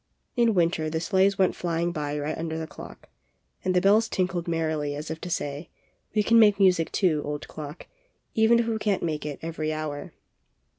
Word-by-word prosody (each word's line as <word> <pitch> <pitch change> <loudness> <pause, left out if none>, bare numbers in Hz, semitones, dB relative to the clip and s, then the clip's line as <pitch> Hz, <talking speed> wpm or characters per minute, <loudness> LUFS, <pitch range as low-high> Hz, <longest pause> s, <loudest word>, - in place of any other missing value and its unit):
In 235 -3 +3
winter 165 -2 +1
the 160 +1 -1
sleighs 190 +3 +2
went 190 -1 +2
flying 170 0 -1
by 150 -3 -3
right 150 +1 -2
under 160 -1 -4
the 160 - -3
clock, - - -12 0.5
and 185 0 0
the 180 - +4
bells 215 +4 +4
tinkled 180 -2 -1
merrily 155 -3 -1
as 150 +2 -5
if 160 - -6
to 180 - -5
say: 145 -1 -3 0.5
'We 210 - +3
can 230 +2 +5
make 210 -2 +6
music, 180 -4 +3
too, 165 -7 +2
old 145 0 -5
clock, 150 +1 -8 0.5
even 225 +1 +5
if 235 - +2
we 225 -1 -1
can't 205 -3 0
make 155 -3 -2
it 145 - -5
every 160 -1 -3
hour." 155 -2 -4
165 Hz, 195 wpm, -26 LUFS, 155-195 Hz, 0.5 s, make